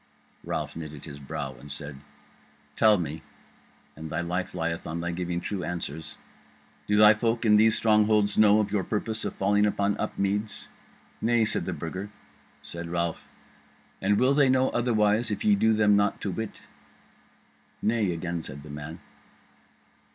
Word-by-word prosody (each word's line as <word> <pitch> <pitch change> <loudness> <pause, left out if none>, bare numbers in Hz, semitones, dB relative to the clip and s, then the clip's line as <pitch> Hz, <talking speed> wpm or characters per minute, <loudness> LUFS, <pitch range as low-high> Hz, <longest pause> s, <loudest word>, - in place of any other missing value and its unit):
Ralph - - -4
knitted 75 -3 -8
his 70 -2 -9
brow, 65 -1 -5
and 70 +2 -11
said: 75 -1 -7 0.8
"Tell 110 -2 +5
me 80 -2 -4 0.7
(and 80 0 -8
thy 80 +3 -2
life 90 +2 -3
lieth 85 -1 -3
on 80 +2 -4
thy 85 +1 -2
giving 85 0 -2
true 95 +1 -4
answers), 80 -3 -5 0.7
do 105 - +2
thy 105 0 +8
folk 115 +2 -1
in 105 -1 +6
these 110 +1 +5
strongholds 105 -2 +3
know 105 0 +6
of 105 -2 -1
your 100 -2 0
purpose 110 +2 -2
of - - -4
falling 100 +1 +2
upon 100 -1 +1
Upmeads?" 100 +2 -2 0.5
"Nay," 115 0 +3
said - - -1
the - - -2
Burger. 95 +5 -5 0.5
Said 85 0 -7
Ralph: 85 -1 -3 0.7
"And 100 +2 +2
will 130 +2 +4
they 140 -2 +4
know 130 0 +3
otherwise 110 -2 +1
if 105 - -3
ye 210 - +5
do 110 - +3
them 105 -1 +4
not 100 0 +1
to 100 - -2
wit?" 110 +4 -6 1.2
"Nay," 110 -4 +1
again 85 0 -3
said 70 -2 -9
the 75 - -10
man. 75 +2 -8
100 Hz, 160 wpm, -27 LUFS, 85-110 Hz, 1.2 s, thy